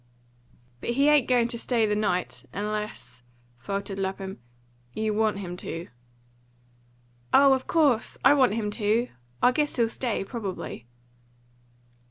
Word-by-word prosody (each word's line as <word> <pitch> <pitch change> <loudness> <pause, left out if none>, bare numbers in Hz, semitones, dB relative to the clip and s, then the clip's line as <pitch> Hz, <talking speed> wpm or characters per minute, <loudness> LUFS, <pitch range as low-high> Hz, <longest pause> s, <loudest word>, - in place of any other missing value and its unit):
"But - - -5
he 280 +2 +4
ain't 295 -5 +4
going 245 -2 +3
to 235 - -3
stay 235 -2 +1
the 210 -1 0
night 185 -4 -1
unless," 205 - -5 0.4
faltered 195 - -4
Lapham, 190 -2 -4 0.5
"you 220 -1 -1
want 215 -1 +1
him 180 -3 -5
to." 165 -1 -6 1.4
"Oh, 275 0 +7
of 260 - -2
course, 285 -8 +2
I 275 - +8
want 260 -7 +3
him 210 -2 -2
to! 220 +3 +1 0.3
I 250 - +7
guess 295 +3 0
he'll 230 -2 +2
stay, 235 -4 -2
probably." 195 - -6
215 Hz, 135 wpm, -26 LUFS, 195-250 Hz, 1.4 s, I